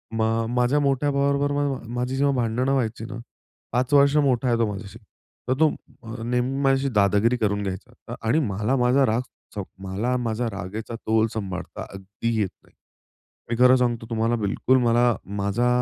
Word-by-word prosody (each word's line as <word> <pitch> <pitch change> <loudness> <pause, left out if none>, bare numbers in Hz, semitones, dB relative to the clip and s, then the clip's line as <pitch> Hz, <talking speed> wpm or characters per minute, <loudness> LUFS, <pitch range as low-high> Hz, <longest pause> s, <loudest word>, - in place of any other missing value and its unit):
मग 115 0 +1
माझ्या 125 +4 +3
मोठ्या 140 0 +1
भावाबरोबर 140 0 +1 0.4
माझी 125 +2 -2
जेव्हा 140 0 +2
भांडणं 125 +2 0
व्हायची 115 -4 -1
ना 115 - -7 0.5
5 130 +3 0
वर्ष 140 +1 +5
मोठा 130 -3 +2
आहे 120 -1 +2
तो 115 - +2
माझ्याशी. 105 +2 -8 0.5
तर 130 - +4
तो 160 - +5 0.3
अ, 115 0 -7
नेहमी 125 +3 -1
माझ्याशी 135 0 +2
दादागिरी 105 +4 +3
करून 105 -2 0
घ्यायचा 115 +5 -7
आणि 115 +8 +2
मला 105 -1 0
माझा 125 +2 +3
राग 115 0 +1 0.3
चौ 100 - -3 0.2
मला 105 +7 -1
माझा 120 0 -2
रागेचा 105 +5 -6
तोल 110 0 +1
सांभाळता 95 -4 -5
अगदी 100 +4 -4
येत 100 -3 +1
नाही. - - -26 0.7
मी 120 - 0
खरं 125 +1 +7
सांगतो 120 -3 0
तुम्हाला 115 +1 +1
बिलकुल 105 +6 +2
मला 120 0 +3 0.2
माझा 100 +5 0
120 Hz, 165 wpm, -24 LUFS, 110-130 Hz, 0.7 s, खरं